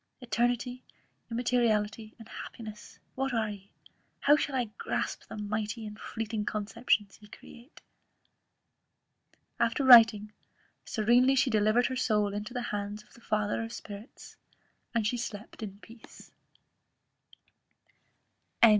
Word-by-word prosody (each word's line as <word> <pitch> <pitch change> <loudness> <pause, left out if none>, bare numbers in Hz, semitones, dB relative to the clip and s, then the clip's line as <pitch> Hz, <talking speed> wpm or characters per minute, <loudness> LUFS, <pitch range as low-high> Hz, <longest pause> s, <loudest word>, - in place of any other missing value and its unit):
Eternity, 245 0 -1 0.5
immateriality, 225 -2 0
and 225 -2 -13
happiness, 215 -2 -9 0.2
what 270 -1 -2
are 220 -2 0
ye? 200 -1 -11 0.5
How 290 - +6
shall 290 -2 -1
I 240 -4 -1
grasp - - -3
the - - -8
mighty 215 +2 -3
and 210 0 -8
fleeting 220 -1 -4
conceptions 210 -1 -1
ye 210 - -14
create?" 235 +5 -15 1.8
After 235 +5 +1
writing, 225 -4 +8 0.5
serenely 245 +5 +3
she 265 -1 +3
delivered 215 +3 +3
her 260 - -1
soul 210 -4 +1
into 210 +3 -4
the 245 0 -3
hands 205 +1 -4
of - - -25
the 235 - -17
Father 215 0 0
of 225 - -6
Spirits; 210 0 -10 0.6
and 225 -2 +2
slept 225 -2 -4
in 200 -2 -6
peace. 230 -1 -15 2.3
CHAP. 230 - +10
225 Hz, 120 wpm, -30 LUFS, 210-245 Hz, 2.3 s, CHAP